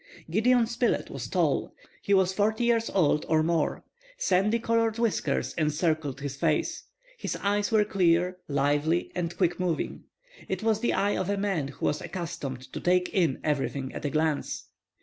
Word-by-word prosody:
Gideon 235 +5 +4
Spilett 240 +1 0
was - - -5
tall. - - 0 0.3
He 200 - -4
was 190 -1 +4
forty 215 +4 +1
years 230 -1 +2
old 150 -5 +2
or 155 -1 +3
more. 165 -1 0 0.3
Sandy 200 - +2
colored 230 -1 +1
whiskers 230 -3 0
encircled 155 -2 0
his 140 -1 -4
face. 160 - 0 0.3
His - - -3
eye 205 +1 +1
was 215 -2 +4
clear, 180 -1 +2
lively, 145 +4 +1
and 175 -1 -3
quick 175 -2 +1
moving. 175 -3 -2 0.4
It 190 +2 -2
was 220 -1 +2
the 240 - +1
eye 205 +1 +1
of 185 0 -2
a 205 - 0
man 195 -8 -1
who 140 - -5
was 150 - 0
accustomed 140 -8 -6
to - - -4
take 180 0 +2
in 165 -8 +1
everything 140 -3 -1
at - - -6
a 145 - 0
glance. 155 0 -1
180 Hz, 170 wpm, -27 LUFS, 155-205 Hz, 0.4 s, Gideon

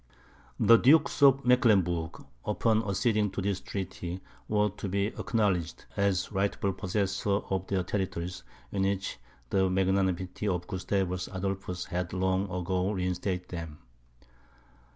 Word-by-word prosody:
The 115 - +7
Dukes 145 +4 +4
of 140 -1 +6
Mecklenburg, 95 -10 +2 0.2
upon 110 +1 +2
acceding 105 +1 +2
to 100 - -2
this 100 -1 0
treaty, 90 -2 -5 0.3
were 105 -1 +2
to 100 0 -6
be 100 +1 +1
acknowledged 100 -11 -1
as 100 -2 +1
rightful 100 0 0
possessors 100 +1 -1
of 95 -1 -1
their 95 -2 0
territories, 90 -2 -3 0.3
in 100 - -1
which 95 -7 -1 0.3
the 95 -1 +3
magnanimity 95 0 0
of 90 -3 -1
Gustavus 95 -1 -2
Adolphus 95 -1 -3
had 90 -1 -3
long 95 +1 0
ago 90 +1 -1
reinstated 90 -1 -2
them. 80 -4 -6
95 Hz, 125 wpm, -29 LUFS, 90-100 Hz, 0.3 s, The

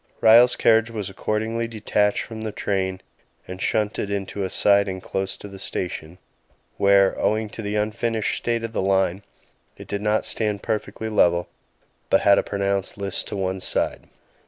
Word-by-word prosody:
Ryall's 120 +2 +7
carriage 115 0 +3
was 105 -4 -5
accordingly 110 +4 -2
detached 105 -2 0
from 110 -1 -8
the 110 -1 -3
train 95 -2 -2 0.5
and 95 +1 -7
shunted 105 -1 -1
into 100 0 -3
a 95 - -2
siding 100 -1 +3
close 95 +1 -3
to - - -9
the 100 -1 -11
station, 90 -3 -4 0.6
where, 100 -1 +4
owing 110 0 0
to 110 - -7
the 105 0 -3
unfinished 110 +1 -1
state 115 -1 -1
of 115 0 -5
the - - 0
line, 95 -1 +1 0.6
it - - -11
did 100 0 -3
not 105 +1 +1
stand 105 -2 -2
perfectly 110 0 -3
level, 85 -5 +2 0.6
but - - +4
had 100 -1 +5
a - - +3
pronounced 100 -1 -2
list 100 -2 -3
to - - -5
one 95 0 -2
side. - - -1
100 Hz, 165 wpm, -23 LUFS, 95-110 Hz, 0.6 s, Ryall's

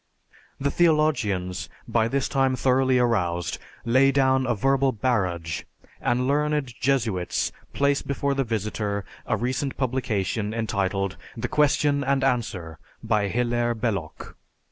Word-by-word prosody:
The 140 +1 0
theologians, 110 - +1 0.2
by 115 -1 +2
this 135 +2 0
time 135 -2 +2
thoroughly 130 0 +3
aroused, 90 -9 0 0.3
lay 130 +4 +5
down 130 -1 +3
a 120 - +1
verbal 135 +4 +2
barrage, 95 -9 -1 0.4
and 125 +1 +1
learned 150 -2 0
Jesuits 110 -9 0 0.2
place 140 0 +2
before 140 0 -1
the 135 0 +1
visitor 105 -3 -2 0.2
a - - +1
recent 130 +3 -2
publication 110 -5 -1
entitled, 100 -3 -1 0.2
"The 115 - -2
Question 145 -1 +2
and 135 0 +1
Answer" 105 - -1 0.2
by 105 -2 +1
Hilaire 120 +2 0
Belloc. 105 -8 -3
120 Hz, 120 wpm, -25 LUFS, 105-135 Hz, 0.4 s, lay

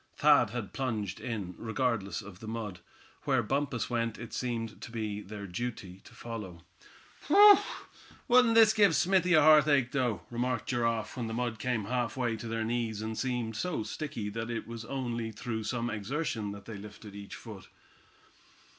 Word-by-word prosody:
Thad - - +5
had 120 -4 -5
plunged 110 -8 -2
in, 105 -7 -4
regardless 110 -4 -1
of 95 -2 -11
the 110 - -9
mud. 110 -5 -5 0.5
Where 130 -4 +2
Bumpus 135 +2 -1
went 115 -2 -1
it 120 - -9
seemed 115 -3 -3
to - - -7
be 105 -3 -3
their 105 0 -8
duty 100 -2 -5
to - - -15
follow. 105 -8 -7 0.6
"Whew! 405 +6 +9 0.7
wouldn't 245 -2 +5
this 220 -1 +7
give 200 -6 +5
Smithy 180 +2 +3
a 155 - +6
heartache 150 -4 +5
though?" 125 -6 0
remarked 120 -1 -2
Giraffe, 115 -2 0
when 120 -3 -3
the 110 - -4
mud 120 -2 -2
came 120 -2 -1
half 120 +1 -1
way 120 -3 0
to 115 - -7
their 115 0 -2
knees, 115 -2 -2
and 110 0 -3
seemed 120 -3 -2
so 155 0 -2
sticky 115 -6 -4
that 115 +2 -4
it 115 -1 -3
was 115 -1 -7
only 120 -3 -3
through 110 0 -4
some 120 0 -2
exertion 110 0 -2
that 100 0 -9
they 110 -3 -7
lifted 105 0 -11
each 100 0 -8
foot. 105 -4 -10
115 Hz, 175 wpm, -30 LUFS, 105-130 Hz, 0.7 s, Whew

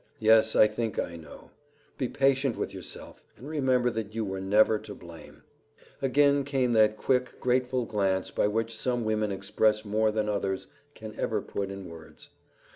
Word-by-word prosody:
Yes, 110 0 +4
I - - +7
think 110 0 -3
I 85 - -2
know. 80 -2 -13 0.5
Be 130 - 0
patient 135 -1 +1
with - - -3
yourself, - - -9
and 135 - -11
remember 130 -5 +1
that 110 -1 -5
you 115 -1 -1
were 95 -1 -4
never 105 +2 +3
to 100 - -9
blame." 85 -2 -13 0.6
Again 140 +1 +3
came 135 -3 0
that 110 -1 +4
quick, 125 +1 0
grateful 125 0 0
glance 95 -4 -1
by - - +1
which 115 +2 -2
some 120 +1 -1
women 110 -1 0
express 105 +2 +1
more 110 +1 +1
than 105 0 -1
others 95 -2 -2 0.3
can 110 -1 -9
ever - - 0
put 100 -1 -4
in 95 -1 -7
words. 80 -1 -12
110 Hz, 170 wpm, -28 LUFS, 100-125 Hz, 0.6 s, I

